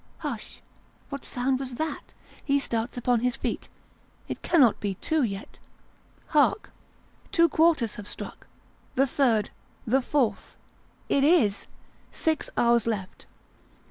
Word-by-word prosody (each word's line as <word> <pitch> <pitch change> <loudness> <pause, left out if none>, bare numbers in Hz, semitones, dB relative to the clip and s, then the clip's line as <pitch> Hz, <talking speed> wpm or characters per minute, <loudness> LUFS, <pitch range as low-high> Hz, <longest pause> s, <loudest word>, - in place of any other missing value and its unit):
Hush! - - -6 0.5
what 280 -1 -6
sound 260 +1 -1
was 260 -2 -5
that? 315 +2 -4 0.3
He 280 0 +2
starts 235 -2 -3
upon 245 0 +2
his 250 +1 0
feet. - - -4 0.6
It - - -5
cannot 270 - +4
be 200 -2 -2
two 315 - 0
yet. 200 -4 -4 0.7
Hark! 300 +6 +2 0.6
Two 335 -3 +5
quarters 310 -8 +3
have 200 - -11
struck; - - -8 0.5
the 270 - +4
third 245 -6 +1 0.3
the 260 +4 +3
fourth. 260 -3 -1 0.5
It 275 - +2
is! 275 - +3 0.4
Six 320 -1 -1
hours 235 -1 +3
left. 200 -5 -4
250 Hz, 125 wpm, -27 LUFS, 230-285 Hz, 0.7 s, Two